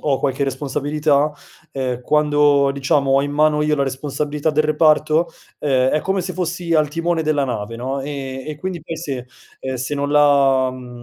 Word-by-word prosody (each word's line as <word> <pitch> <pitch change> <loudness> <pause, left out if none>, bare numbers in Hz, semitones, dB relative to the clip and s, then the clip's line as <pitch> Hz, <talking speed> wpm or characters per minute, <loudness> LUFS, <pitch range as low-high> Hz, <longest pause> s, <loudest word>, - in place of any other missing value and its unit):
ho 140 -3 0
qualche 135 0 -1
responsabilità, 145 +2 0 0.4
e 130 -2 -3
quando 145 -1 +3
diciamo, 140 0 +1
ho 135 +1 +4
in 145 - -3
mano 150 0 +2
io 150 0 +1
la 140 - +1
responsabilità 145 +3 -2
del 155 0 +1
reparto, 155 +1 +3 0.3
eh, 130 -3 +2
è 155 - +1
come 190 +1 -1
se 185 +1 -4
fossi 175 -1 -2
al 155 -2 +3
timone 165 +1 -1
della 150 -2 +1
nave 115 -2 -4
no, 130 +3 -3
e 135 -2 -5
e 150 - -5
quindi 185 -2 -4
poi 165 0 -6
se, 135 -6 -5 0.3
ehm, 130 0 -4
se 130 +4 -3
non 145 0 -2
la, 140 -3 +4
mhmm, 125 -1 -10
145 Hz, 185 wpm, -20 LUFS, 135-155 Hz, 0.4 s, ho